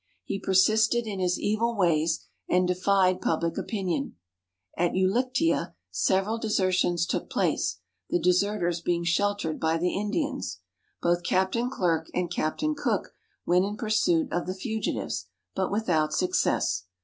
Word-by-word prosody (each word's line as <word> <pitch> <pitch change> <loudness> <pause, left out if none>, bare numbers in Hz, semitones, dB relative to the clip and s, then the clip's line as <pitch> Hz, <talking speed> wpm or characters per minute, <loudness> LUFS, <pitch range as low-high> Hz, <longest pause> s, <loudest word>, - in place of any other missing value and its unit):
He 195 - -3
per 190 - -2
sisted 220 +5 +4
in 205 -3 -4
his 180 -1 +1
evil 225 +2 0
ways, 165 -3 +1 0.2
and 180 0 +3
defied 185 0 +2
public 165 +1 0
opinion. 180 -9 -2 0.6
At 175 0 +1
Ulictea 190 - +1 0.2
several 190 - +1
desertions 185 -5 +1
took 180 - -3
place, - - 0 0.3
the - - +2
deserters 180 0 +1
being 170 0 0
sheltered 180 -1 0
by 160 0 +1
the 180 +2 0
Indians. 210 - -2 0.5
Both 175 0 +2
Captain 190 +8 +1
Clerke 165 -9 0
and 180 -1 -1
Captain 230 - -1
Cook 295 - -2 0.3
went 180 +1 +3
in 205 +2 -3
pursuit 280 +10 +2
of 175 0 -1
the 185 - -3
fugitives, 185 - -3 0.3
but 190 - -1
without 170 -8 +1
success. 95 - +1
185 Hz, 135 wpm, -27 LUFS, 170-210 Hz, 0.6 s, sisted